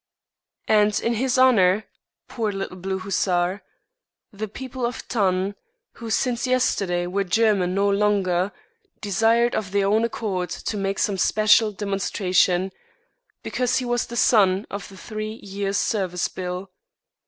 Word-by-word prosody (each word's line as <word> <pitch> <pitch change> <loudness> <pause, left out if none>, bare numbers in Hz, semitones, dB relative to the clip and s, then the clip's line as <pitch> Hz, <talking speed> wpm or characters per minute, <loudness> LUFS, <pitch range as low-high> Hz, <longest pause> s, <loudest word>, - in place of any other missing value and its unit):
And 210 -1 +3
in 235 - 0
his 255 +3 0
honour, 215 -6 +4 0.4
poor 225 -4 -2
little 195 -2 -5
blue 190 +1 -3
hussar, 185 0 0 0.7
the 215 +2 -4
people 255 +4 -7
of 240 +1 -1
Thann, 190 -3 0 0.4
who 230 -1 -9
since 245 +2 0
yesterday 195 -8 +1
were 195 +3 -1
German 195 -2 +2
no 200 +1 +2
longer, 200 -2 +1 0.5
desired 225 +4 +2
of 205 -3 -2
their 200 0 +1
own 215 +3 +2
accord 195 -6 -2
to 210 - -4
make 195 -1 -2
some 195 -2 0
special 215 +2 +4
demonstration, 190 -2 0 0.7
because 250 -1 0
he 255 - -1
was 240 0 -1
the 235 - -6
son 200 -4 +4
of 200 0 -6
the 195 - -13
Three 215 +1 -5
Years' 200 0 -2
Service 185 -5 0
Bill. 180 +1 -5
200 Hz, 140 wpm, -23 LUFS, 190-225 Hz, 0.7 s, honour